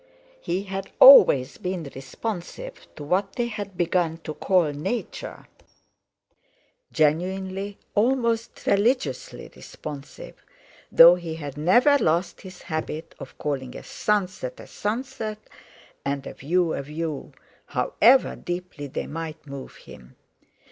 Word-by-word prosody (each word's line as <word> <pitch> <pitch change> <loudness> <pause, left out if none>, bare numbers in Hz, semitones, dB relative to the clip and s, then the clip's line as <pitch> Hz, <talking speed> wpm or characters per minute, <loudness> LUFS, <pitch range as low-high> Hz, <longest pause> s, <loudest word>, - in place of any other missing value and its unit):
He 185 - -2
had 195 0 -5
always 485 - +8
been 180 -2 -3
responsive 220 - -7
to 150 - -8
what 190 +6 0
they 240 - -1
had 205 -5 -6
begun 175 -2 +1
to 155 - -5
call 180 -3 +2
"Nature," 190 +11 -5 1.5
genuinely, 190 +5 0 0.2
almost 230 0 0
religiously 250 - 0
responsive, 145 -2 -10 0.5
though 170 +1 +9
he 170 -2 -4
had 145 -4 -7
never 245 - +4
lost 170 0 0
his 185 -1 -12
habit 155 0 -5
of - - -10
calling 135 -4 -4
a - - -10
sunset 210 - -2
a - - -10
sunset 215 -1 -4 0.7
and 140 -1 -3
a - - -7
view 170 +3 0
a - - -2
view, 150 +1 -5 0.4
however 265 - +3
deeply 175 -4 -6
they 130 - -4
might 160 0 -7
move 140 -2 -9
him. 60 -1 -15
180 Hz, 120 wpm, -24 LUFS, 155-210 Hz, 1.5 s, though